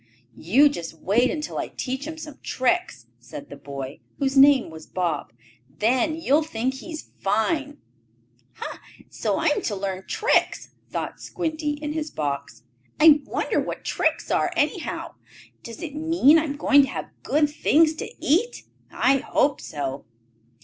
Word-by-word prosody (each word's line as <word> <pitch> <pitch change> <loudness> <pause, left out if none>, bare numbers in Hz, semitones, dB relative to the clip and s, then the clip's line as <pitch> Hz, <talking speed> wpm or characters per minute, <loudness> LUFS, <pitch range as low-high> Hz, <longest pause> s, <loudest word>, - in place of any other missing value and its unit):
"You 250 - +4
just 170 - -4
wait 225 +9 +2
until 305 -1 -3
I - - -2
teach 265 +2 -4
him 320 0 -6
some 305 -3 -9
tricks," 260 - -1
said 120 +4 -10
the - - -7
boy, 140 -1 -7 0.2
whose 275 -1 0
name 270 - +6
was 160 0 -11
Bob. 165 -10 -2 0.4
"Then 240 - +1
you'll 315 -2 +2
think 260 -4 -2
he's 310 +4 -8
fine!" 280 +9 0 0.8
"Ha! - - -7 0.3
So - - -1
I 325 - +2
am 295 - 0
to 210 - -2
learn 190 -1 -4
tricks," 450 - +1 0.2
thought - - -5
Squinty 315 -3 -2
in 295 0 -5
his 310 -1 -3
box. 140 - -4 0.4
"I 305 -1 +7
wonder - - 0
what - - -4
tricks - - 0
are, - - +2
anyhow? - - -1 0.5
Does 230 +4 -9
it 305 -4 -5
mean 320 0 +4
I 315 - -1
am 285 -1 -4
to 285 -1 +6
have - - -6
good 300 0 +2
things 310 +1 +3
to - - -5
eat? 430 - +1 0.3
I 270 +1 +3
hope 280 +2 +1
so." 140 -3 -5
275 Hz, 155 wpm, -24 LUFS, 190-310 Hz, 0.8 s, I